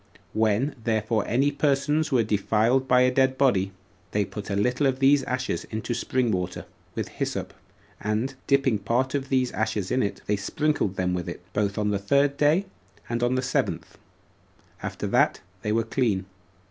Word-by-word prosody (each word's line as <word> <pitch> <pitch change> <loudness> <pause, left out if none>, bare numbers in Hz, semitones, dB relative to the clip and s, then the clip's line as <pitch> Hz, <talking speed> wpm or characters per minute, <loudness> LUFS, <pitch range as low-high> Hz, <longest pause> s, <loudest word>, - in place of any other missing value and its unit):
When 110 +6 +1
therefore 110 -1 0
any 135 +5 +2
persons 145 +2 +1
were 125 -3 +4
defiled 110 +5 +2
by 125 -1 +5
a 125 0 +4
dead 130 0 +3
body, 100 -9 +2 0.4
they 105 -1 +2
put 105 +1 -7
a 100 - -1
little 125 +7 +2
of 130 -1 0
these 135 +1 +5
ashes 130 0 -2
into 110 +2 -4
spring 125 0 0
water, 90 -2 -3 0.3
with - - -2
hyssop, - - -3 0.5
and, 110 +6 -1
dipping 135 -6 +3
part 120 +6 0
of 140 -1 -2
these 130 -2 +1
ashes 105 -3 -2
in 130 - +2
it, 100 - -2
they 105 - +1
sprinkled 145 -2 0
them 90 -1 0
with 90 -1 -3
it, - - -8
both 100 -2 0
on 105 -1 +1
the 100 - 0
third 140 +7 +2
day, 150 +7 +3 0.4
and 120 0 -1
on 120 +1 +2
the 130 - 0
seventh, 130 - -1 0.9
and - - -3
after - - -6
that - - +2 0.2
they 105 - -1
were 115 +1 +2
clean. 110 -5 0
120 Hz, 180 wpm, -26 LUFS, 105-135 Hz, 0.9 s, by